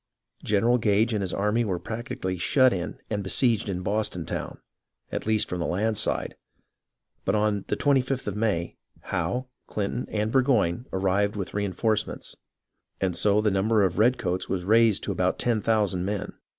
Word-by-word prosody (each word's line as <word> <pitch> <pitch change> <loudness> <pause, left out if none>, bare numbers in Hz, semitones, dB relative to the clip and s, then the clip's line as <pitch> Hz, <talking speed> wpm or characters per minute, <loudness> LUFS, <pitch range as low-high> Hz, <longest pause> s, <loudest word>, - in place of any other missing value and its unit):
General 115 +4 +2
Gage 110 +1 +2
and 105 - 0
his 95 -3 -2
army 105 +4 +1
were 95 -5 -1
practically 110 -3 -4
shut 130 +7 +4
in 90 -2 -4
and 105 -1 -1
besieged 110 +2 +1
in 90 -1 -3
Boston 100 -4 -1
town, - - -5 0.5
at - - -4
least 110 -1 +2
from 90 - -4
the 85 - -1
land 110 +5 0
side; 110 - 0 0.9
but - - +1
on 105 -2 +1
the - - -1
25th 135 -2 +1
of 105 - -3
May, 105 -6 -1 0.2
Howe, 125 +1 -2 0.2
Clinton, 105 +4 -3
and 105 0 -1
Burgoyne 125 -5 +2
arrived 95 +2 +1
there - - -4
with 95 - -7
reenforcements, 105 +2 -1 0.6
and 95 -3 0
so 105 +2 +3
the 105 -1 +2
number 105 +2 +2
of 95 -3 +2
the - - -4
red 125 +4 +4
coats 90 -3 -2
was 90 -2 -2
raised 110 0 +4
to - - -2
about 90 -1 0
10,000 105 -5 +1
men. 100 +1 -3
105 Hz, 175 wpm, -26 LUFS, 95-115 Hz, 0.9 s, shut